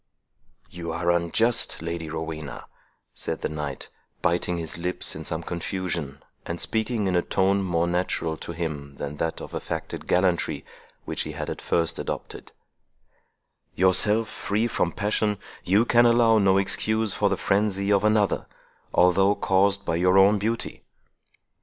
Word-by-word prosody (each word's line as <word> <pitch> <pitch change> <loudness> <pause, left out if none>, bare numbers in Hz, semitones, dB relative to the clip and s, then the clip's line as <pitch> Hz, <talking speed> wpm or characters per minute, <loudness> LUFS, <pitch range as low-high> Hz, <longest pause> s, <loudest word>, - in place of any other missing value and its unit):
"You 85 -2 -5
are 85 +1 +1
unjust, 85 +8 +1
Lady 85 -1 -4
Rowena," 80 -2 -6 0.5
said - - -4
the - - 0
knight, 75 -2 -5 0.3
biting 85 0 +1
his 80 -2 -4
lips 90 +2 -2
in 80 - -6
some 80 +1 -4
confusion, 85 -5 -4 0.2
and 85 0 -5
speaking 110 -1 0
in 95 -1 +1
a 90 - +4
tone 95 +2 +1
more 85 -3 +1
natural 85 -2 -1
to - - -6
him 75 -4 -5
than 70 +1 -6
that 80 +1 -2
of - - -9
affected - - -5
gallantry, 90 -1 +1 0.4
which - - -3
he - - -4
had - - -4
at - - -6
first 85 -2 0
adopted; - - -6 1.2
"yourself 105 +4 +3
free 105 +3 -1
from 90 -7 0
passion, 105 +1 0 0.3
you 100 +5 +3
can 120 0 +5
allow 115 -1 +5
no 95 -1 +4
excuse 110 +2 +1
for 100 - +1
the - - 0
frenzy 100 0 +1
of 100 0 +3
another, 105 -2 +2 0.5
although 95 +3 +4
caused 100 +1 +2
by 85 - 0
your 90 +2 +4
own 100 +2 +6
beauty." 115 +3 -3
95 Hz, 150 wpm, -25 LUFS, 85-105 Hz, 1.2 s, own